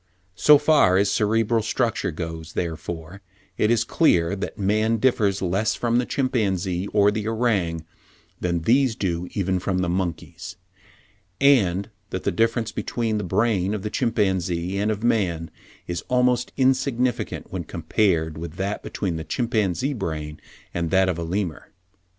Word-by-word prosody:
"So 150 +10 +6
far 145 -11 +4
as 100 0 +2
cerebral 110 +2 +2
structure 110 - -1
goes, 80 0 -6
therefore, 85 +2 -5 0.3
it 105 - +1
is 115 -1 +3
clear 100 - +2
that 100 - -5
man 110 +3 +1
differs 105 -5 +1
less 95 +5 0
from 120 0 +1
the 125 - -1
chimpanzee 95 -8 -1
or 105 0 +3
the 105 0 -3
orang, 100 -9 0 0.5
than 85 -2 -1
these 125 +3 +3
do 90 -3 -2
even 95 -2 0
from 95 +1 -1
the 90 -1 0
monkeys, 85 0 -4 0.8
and 110 -8 +3 0.2
that 95 - -4
the - - +1
difference 115 +3 0
between 115 -2 -2
the - - -3
brain 100 0 +1
of 100 - -5
the 105 - -3
chimpanzee 95 -7 0
and 105 +1 +1
of 110 0 -2
man 90 -9 0 0.3
is 85 -1 -3
almost 125 -1 +2
insignificant 130 -2 0
when - - -3
compared 80 -7 0
with 85 -1 -6
that 100 +3 -3
between 90 -5 -3
the 80 - -5
chimpanzee 120 - 0
brain 80 - -5 0.3
and 85 -1 -1
that 95 0 +3
of 85 -2 -2
a - - -2
Lemur." 90 -1 -3
100 Hz, 150 wpm, -23 LUFS, 85-115 Hz, 0.8 s, So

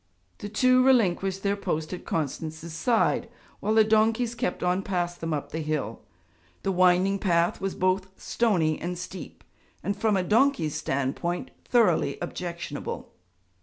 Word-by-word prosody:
The 205 - -6
two 255 +4 +4
relinquished 195 -7 +2
their 200 0 +1
post 170 -5 -3
at 180 - -7
Constance's 160 +1 -3
side, 230 +6 +1 0.3
while 215 +2 0
the 220 - +7
donkeys 220 +2 +2
kept 200 -6 -2
on 180 +1 +1
past 175 -3 -2
them 165 0 -2
up 150 -2 -3
the 160 - -3
hill. 150 -8 -3 0.6
The 195 - +1
winding 185 +2 +3
path 170 -3 +1
was 195 -1 -2
both 185 +1 +1
stony 175 -10 +1
and 175 +1 -3
steep, 180 +1 -8 0.4
and, 200 - -1
from 210 -1 +1
a 185 - +1
donkey's 215 - +2
standpoint, 140 - -2
thoroughly 235 -3 +3
objectionable. 175 -3 -5
185 Hz, 145 wpm, -26 LUFS, 170-215 Hz, 0.6 s, the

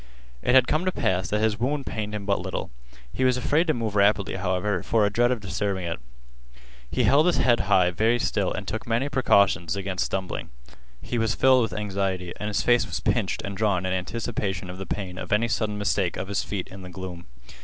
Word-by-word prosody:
It 125 - +2
had 130 -1 +6
come 155 +3 +1
to 185 - +2
pass 90 - 0
that 105 +2 0
his 110 0 +1
wound 140 +4 -1
pained 105 -1 -4
him 100 -1 -5
but 100 -1 +1
little. - - -4 0.4
He 130 - -1
was 130 -1 +3
afraid 150 +6 +1
to 155 - +3
move 110 -3 -3
rapidly, 100 -1 +3
however, 95 +2 -1
for 110 -2 +2
a 100 - 0
dread 120 +4 +3
of 125 -3 -1
disturbing 100 -1 -2
it. 85 -6 -3 0.9
He - - 0
held 150 +4 +5
his 180 - +3
head 120 -3 +3 0.3
very 115 +4 +3
still - - 0
and - - -5
took - - -4
many 120 +5 0
precautions 100 - +3
against 95 -2 -2
stumbling. 95 -1 -4 0.5
He 120 - -2
was 115 0 +1
filled 130 -1 +5
with 115 -3 -1
anxiety, 95 -3 -2
and 105 - -3
his 105 - 0
face 120 0 +3
was - - -3
pinched - - 0
and 100 0 -5
drawn 100 -3 +1
in 95 - 0
anticipation 95 -2 -3
of 90 - -10
the 95 - -6
pain 95 -3 -4
of - - -7
any 110 +3 +3
sudden 105 -2 -1
mistake 100 -3 0
of 95 - -5
his 100 - 0
feet 100 -4 -4
in 95 0 -10
the 90 - -9
gloom. 90 -2 -8
105 Hz, 220 wpm, -25 LUFS, 95-120 Hz, 0.9 s, had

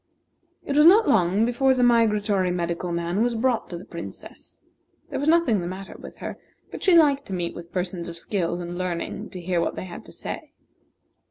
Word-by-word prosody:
It 280 - -2
was 300 +2 +7
not 420 +5 +7
long 195 +2 +3
before 260 +2 +2
the 250 - +2
migratory 210 -5 +3
medical 175 0 -2
man 170 +3 -1
was 240 0 +1
brought 240 +1 0
to 175 - -5
the 180 - -10
Princess. 170 -1 -10 0.5
There - - -2
was 285 +3 +1
nothing 315 - +3
the 175 - -4
matter 190 +2 -7
with - - -11
her, - - -7 0.3
but - - -7
she 365 -3 +5
liked 285 -3 +4
to 195 - -6
meet 175 -2 -2
with 170 0 -10
persons 180 -1 -3
of 170 0 -7
skill 175 -1 -2
and 175 +1 -6
learning 185 +4 -3
to 185 - -8
hear 175 0 0
what - - -1
they - - -5
had 175 - -9
to - - -13
say. - - -7
190 Hz, 205 wpm, -24 LUFS, 175-245 Hz, 0.5 s, was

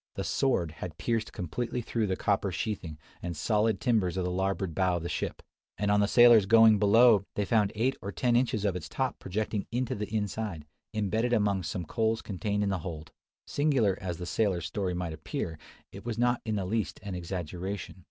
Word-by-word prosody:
The - - -3
"sword" 95 - +1
had 85 -4 -6
pierced 110 +5 -1
completely 115 +7 -3
through 115 -2 -1
the 95 - 0
copper 100 -1 0
sheathing 95 -5 -4 0.2
and 85 -2 -4
solid 105 +3 +1
timbers 105 -6 +1
of 95 - 0
the 90 - -1
larboard 95 -1 -1
bow 95 +1 +1
of 85 - -5
the 85 - -3
ship; - - -3 0.3
and 105 +1 +1
on 105 - +4
the 100 - +3
sailors 120 -3 +7
going 110 -1 +7
below, 110 0 +6
they 105 - 0
found 105 0 +2
eight 125 +5 +1
or 100 - -4
ten 120 +1 +1
inches 120 -4 +1
of 100 -3 +1
its 90 - -6
top 130 -2 -2
projecting 105 +1 -3
into 125 +1 -1
the 105 -3 -5
inside, 105 -6 -3 0.3
embedded 110 +3 0
among 105 -4 +2
some 90 -1 -4
coals 110 +5 0
contained 105 +1 -2
in 100 - 0
the 95 -2 -1
hold! 80 -2 -7 0.3
Singular 135 -10 +2
as 90 -3 -3
the 90 - -5
sailor's 90 -1 0
story 95 +1 -2
might 85 -2 -3
appear, 80 0 -5 0.3
it 100 - -10
was 115 -1 -4
not 120 0 +2
in 110 -1 -1
the 100 -2 -1
least 110 +3 -2
an 100 -2 -5
exaggeration. 90 +2 -5
100 Hz, 200 wpm, -29 LUFS, 90-110 Hz, 0.3 s, sailors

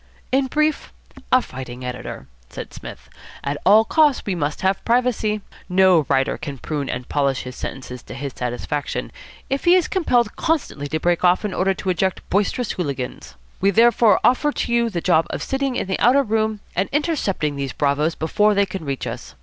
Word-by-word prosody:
"In 265 +1 +2
brief, 305 +3 0 0.4
a 255 - +5
fighting 125 -1 -8
editor," 125 0 -6 0.2
said - - -8
Psmith. - - -10 0.4
"At 145 +1 -2
all 215 +3 +7
costs 300 0 +3
we 200 - -1
must 150 -4 -2
have 190 0 0
privacy. 230 -3 +1 0.3
No 180 -5 +4
writer 135 0 +1
can 140 -3 -6
prune 145 +1 -4
and 125 0 -4
polish 140 -2 0
his 125 0 -8
sentences 125 -2 -6
to 125 - -10
his 140 +1 -5
satisfaction 125 +4 -3 0.4
if 275 +4 -2
he 350 +1 +7
is 365 -3 +3
compelled 245 - +1
constantly 290 - -1
to 155 +2 -2
break 175 +2 +1
off 180 +3 +3
in 205 - -2
order 190 +1 +1
to 190 - -2
eject 190 +1 -1
boisterous 210 +4 0
hooligans. 140 -7 -5 0.2
We 195 - +3
therefore 230 0 +5
offer 295 +4 +3
you 235 -1 +1
the 175 -5 -3
job 165 -3 +3
of - - -4
sitting 270 -1 -1
in - - -1
the 190 0 -2
outer 270 +3 +5
room 220 -2 -1
and 190 +3 0
intercepting 270 - 0
these 140 -1 -3
bravoes 150 +3 0
before 210 +7 +2
they 200 0 +3
can 190 -3 -6
reach 140 -3 -3
us. - - -7
190 Hz, 185 wpm, -21 LUFS, 145-235 Hz, 0.4 s, all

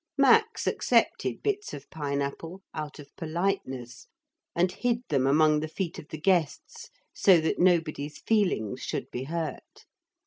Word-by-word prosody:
Max 440 +11 +4
accepted - - +1
bits 415 0 -1
of 140 - -11
pine 140 -2 -2
apple, 165 +7 -6
out 155 -2 -5
of 145 -1 -13
politeness, 160 -8 -3 0.5
and 180 +1 +2
hid 240 +2 -1
them 135 -4 +2
among 155 +2 +4
the 155 - -3
feet 170 +2 -4
of 150 - -11
the 155 - -7
guests 195 - 0 0.2
so 185 -4 +5
that 160 0 -1
nobody's 160 -5 +1
feelings 190 - 0
should - - -4
be 125 +2 -4
hurt. 165 +1 -5
160 Hz, 145 wpm, -28 LUFS, 145-195 Hz, 0.5 s, so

